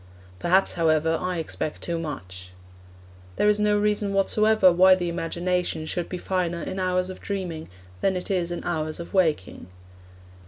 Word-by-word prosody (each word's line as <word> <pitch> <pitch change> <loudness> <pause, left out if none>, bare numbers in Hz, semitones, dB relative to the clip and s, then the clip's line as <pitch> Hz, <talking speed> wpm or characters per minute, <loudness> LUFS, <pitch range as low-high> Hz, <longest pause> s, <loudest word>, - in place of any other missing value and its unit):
Perhaps, 185 +3 +3
however, 160 -1 +2
I 180 -1 -2
expect 155 -1 -4
too 170 -1 -2
much. 95 - -7 0.8
There 210 - +2
is 210 0 +3
no 210 0 +3
reason 205 -1 0
whatsoever 210 0 +4
why 185 +2 +6
the 175 -2 -2
imagination 175 -1 -2
should 175 +2 -3
be 180 - -4
finer 175 -2 -2
in 190 - -4
hours 185 0 0
of 185 - -11
dreaming 180 -6 -4 0.3
than 190 - +2
in 180 - -3
its 175 -3 -2
hours 155 -2 -2
of 170 - -8
waking. 160 - 0
180 Hz, 155 wpm, -25 LUFS, 165-190 Hz, 0.8 s, why